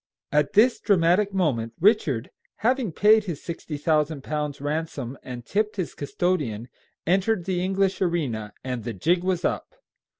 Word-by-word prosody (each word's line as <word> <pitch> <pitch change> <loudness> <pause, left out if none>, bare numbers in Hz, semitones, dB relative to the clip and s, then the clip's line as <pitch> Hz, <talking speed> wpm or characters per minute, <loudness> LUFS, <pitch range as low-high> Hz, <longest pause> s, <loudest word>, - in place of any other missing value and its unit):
At 150 +6 +2
this 230 +4 +5
dramatic 190 +1 +3
moment 135 -12 0
Richard, 160 - +2 0.3
having 250 -4 +2
paid 215 +5 +5
his 170 -7 -5
sixty 165 -3 -5
thousand 150 -1 +1
pounds 150 -1 -3
ransom 145 -3 -3
and 120 -2 -8
tipped 210 - 0
his 185 -5 -3
custodian, 145 - -2 0.4
entered 190 +2 +1
the 185 -2 -1
English 195 0 0
arena, 135 - -1
and 125 -3 -4
the 120 +1 -4
jig 170 - +1
was 185 -1 0
up. - - -2
165 Hz, 145 wpm, -25 LUFS, 140-195 Hz, 0.4 s, this